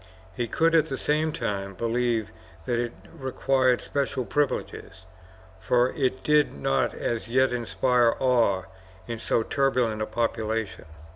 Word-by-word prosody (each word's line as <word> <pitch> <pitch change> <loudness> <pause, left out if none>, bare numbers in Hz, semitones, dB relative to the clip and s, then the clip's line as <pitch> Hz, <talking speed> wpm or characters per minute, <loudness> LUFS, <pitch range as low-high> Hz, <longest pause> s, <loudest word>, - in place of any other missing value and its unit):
He 120 +2 -2
could, 165 +8 +2
at 160 -3 +4
the 135 - -4
same 155 +3 +1
time, 100 -7 -3
believe 115 0 0 0.3
that 120 -1 0
it 120 -1 -2 0.2
required 130 -3 +1
special 140 -2 -2
privileges, 105 -9 -2 0.5
for 120 +6 +2
it 130 - -1
did 150 - +3
not 70 -1 0
as 115 -1 -3
yet 130 +1 +2
inspire 120 0 +2
awe 115 -8 +2 0.4
in 115 -1 -4
so 115 - +1
turbulent 125 -5 0
a 110 - -1
population. 110 -3 -2
120 Hz, 135 wpm, -26 LUFS, 110-130 Hz, 0.5 s, at